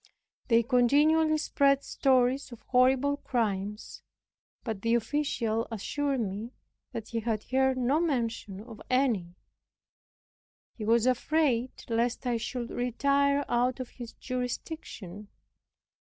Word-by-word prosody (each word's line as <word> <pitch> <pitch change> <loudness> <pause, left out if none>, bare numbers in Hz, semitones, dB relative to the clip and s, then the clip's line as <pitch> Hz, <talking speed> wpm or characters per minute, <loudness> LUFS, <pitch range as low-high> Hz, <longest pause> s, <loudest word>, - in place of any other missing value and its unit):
They 230 -1 +4
continually 295 +6 +4
spread 280 -3 +2
stories 260 0 +2
of 240 - -11
horrible 265 +3 +3
crimes; 210 -5 -3 0.6
but 220 -5 -4
the 230 +2 +2
official 230 -2 -1
assured 270 +5 -2
me 215 +4 -4 0.4
that 225 -1 -6
he 230 - -2
had 220 -1 -2
heard 265 0 +1
no 255 +4 +2
mention 230 - -2
of 225 -1 -11
any. 230 -10 +1 1.4
He 215 - -6
was 230 +1 +3
afraid 255 -1 +1
lest 235 +2 0
I 245 -2 +1
should 235 +1 -4
retire 280 +3 +1
out 245 +2 +1
of 255 - -5
his 240 -2 -9
jurisdiction. 245 - -6
245 Hz, 115 wpm, -29 LUFS, 230-275 Hz, 1.4 s, They